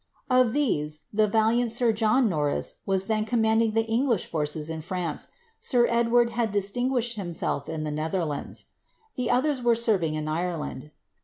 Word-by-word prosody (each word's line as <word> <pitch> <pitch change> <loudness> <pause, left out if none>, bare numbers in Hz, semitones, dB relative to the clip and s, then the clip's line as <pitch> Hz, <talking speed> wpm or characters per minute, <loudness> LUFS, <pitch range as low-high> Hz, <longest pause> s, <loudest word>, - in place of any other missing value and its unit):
Of 255 -3 +4
these, 155 - 0
the 215 0 +3
valiant 225 +2 +2
sir 235 0 +3
John 225 +3 +3
Norris 150 -6 -1
was 190 -1 +1
then 215 0 0
commanding 220 -1 +2
the 225 0 +2
English 230 -2 +1
forces 150 -1 -2
in 160 -1 -4
France, 175 -1 -3 0.3
sir 245 -2 +3
Edward 235 0 +3
had 230 -2 -1
distinguished 240 +4 0
himself 170 -6 -3
in 160 -1 -3
the 150 - -3
Netherlands. 155 0 -3 0.4
The 250 -3 -2
others 260 +2 +1
were 240 -1 +3
serving 200 -9 +1
in 155 0 -3
Ireland. 155 -4 -3
215 Hz, 155 wpm, -26 LUFS, 160-235 Hz, 0.4 s, Of